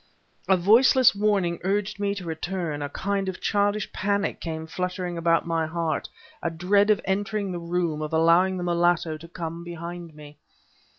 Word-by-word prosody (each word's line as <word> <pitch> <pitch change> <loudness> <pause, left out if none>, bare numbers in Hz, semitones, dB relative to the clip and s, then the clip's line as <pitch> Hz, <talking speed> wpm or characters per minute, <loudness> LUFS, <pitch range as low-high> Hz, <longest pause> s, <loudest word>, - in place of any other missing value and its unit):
A 190 - +5
voiceless 235 +7 +5
warning 200 -4 +1
urged 200 +2 -1
me 200 0 0
to 190 -3 -7
return; 165 -2 -3
a 145 - -3
kind 195 +4 -2
of 185 - -6
childish 205 0 0
panic 200 +1 -1
came 160 -1 -4
fluttering 180 +1 -3
about 165 0 +2
my 165 -1 0
heart, 165 -1 -2 0.3
a 170 - 0
dread 195 +5 +2
of 210 - +4
entering 200 0 -1
the 175 - -4
room, 170 -2 -1
of 155 - -4
allowing 170 +4 +4
the 180 - -3
mulatto 175 -2 +1
to 165 +2 -12
come 165 0 -6
behind 170 -1 -7
me. 150 -1 -13
175 Hz, 170 wpm, -25 LUFS, 165-200 Hz, 0.3 s, A